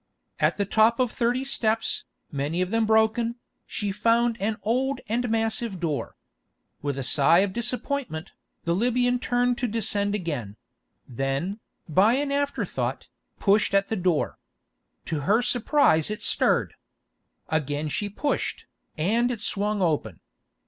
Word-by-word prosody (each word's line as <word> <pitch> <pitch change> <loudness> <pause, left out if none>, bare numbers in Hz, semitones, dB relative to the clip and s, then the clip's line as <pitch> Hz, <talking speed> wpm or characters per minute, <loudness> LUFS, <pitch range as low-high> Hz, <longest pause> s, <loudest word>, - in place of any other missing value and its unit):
At - - +2
the 200 - 0
top 220 +4 +3
of 250 -3 +2
thirty 245 +2 0
steps, 225 -4 0 0.3
many 145 +4 -2
of 185 - -5
them 225 -1 +2
broken, 220 +2 +2 0.3
she 205 -1 -3
found 230 +3 +2
an 210 +1 0
old 255 +4 0
and 240 +3 -1
massive 225 -2 -1
door. 155 -5 -3 0.7
With 140 -1 -2
a 135 - -2
sigh 155 +7 +5
of 195 -1 -1
disappointment, 240 - -2 0.3
the 170 - 0
Libyan 245 +4 +1
turned 245 0 +1
to 245 - 0
descend 210 -2 +1
again; 140 - -4 0.5
then, 135 - -2 0.3
by 195 +9 +4
an 280 +1 -1
afterthought, 285 0 -2 0.3
pushed 200 0 +3
at 195 0 +2
the 220 - 0
door. 180 -5 0 0.7
To 155 - -2
her 210 - +2
surprise 240 - +3
it 210 +1 -4
stirred. - - +2 0.8
Again 150 -1 -1
she 205 +7 -2
pushed, 285 +8 -2 0.3
and 225 +10 +2
it 235 -4 -4
swung 210 -1 0
open. 160 -4 -1
215 Hz, 140 wpm, -25 LUFS, 170-240 Hz, 0.8 s, sigh